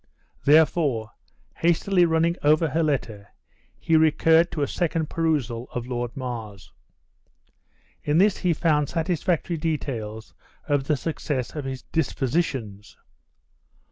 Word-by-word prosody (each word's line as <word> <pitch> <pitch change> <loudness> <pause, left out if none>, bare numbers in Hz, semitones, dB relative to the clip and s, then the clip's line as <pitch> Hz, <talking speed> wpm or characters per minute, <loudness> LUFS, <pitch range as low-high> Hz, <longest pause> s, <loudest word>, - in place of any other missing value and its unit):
Therefore, 145 -7 +3 0.5
hastily 175 +2 +3
running 165 +1 +2
over 155 +2 +3
her 165 - 0
letter, 120 -10 -2 0.5
he 165 - +1
recurred 160 +2 +4
to 150 - -2
a - - 0
second 165 -2 -2
perusal 140 -8 -1
of 120 -1 -3
Lord 120 +1 -4
Mar's. 115 -7 -6 1.3
In 150 +1 +1
this 195 +2 +4
he 180 - +1
found 150 -3 +1
satisfactory 170 0 -1
details 120 -9 -4 0.3
of 145 -2 +1
the 150 0 +1
success 145 -4 -3
of 150 -3 -4
his 130 -1 -5
dispositions. 125 - -2
150 Hz, 115 wpm, -24 LUFS, 125-165 Hz, 1.3 s, recurred